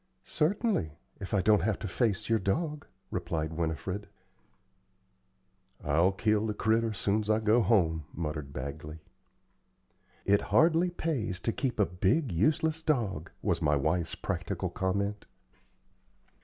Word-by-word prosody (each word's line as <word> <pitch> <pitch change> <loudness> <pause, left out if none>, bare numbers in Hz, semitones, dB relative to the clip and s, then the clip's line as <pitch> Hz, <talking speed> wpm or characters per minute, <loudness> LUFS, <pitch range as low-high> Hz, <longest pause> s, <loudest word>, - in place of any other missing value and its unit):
"Certainly, 165 - 0 0.3
if 95 - -7
I 100 -3 +2
don't 105 -1 +5
have 105 +2 0
to - - -5
face 105 +1 0
your 115 -1 +2
dog," 150 - -2 0.2
replied 80 -3 -2
Winifred. 85 +5 -3 1.8
"I'll 85 +6 +3
kill 105 +2 +1
the 105 - -2
critter 115 +1 +1
soon's 105 +1 -1
I 110 0 +4
go 110 +2 +3
home," 80 -9 +2
muttered 75 -4 -4
Bagley. 70 +4 -6 1.3
"It 100 +1 +4
hardly 165 +2 +4
pays 135 - -2
to 115 - 0
keep 130 -5 -2
a 105 - +5
big, 95 - +1
useless 155 - +1
dog," 115 - -1
was - - 0
my 75 0 +3
wife's 80 +4 0
practical - - -3
comment. 100 +2 -2
100 Hz, 130 wpm, -30 LUFS, 85-115 Hz, 1.8 s, don't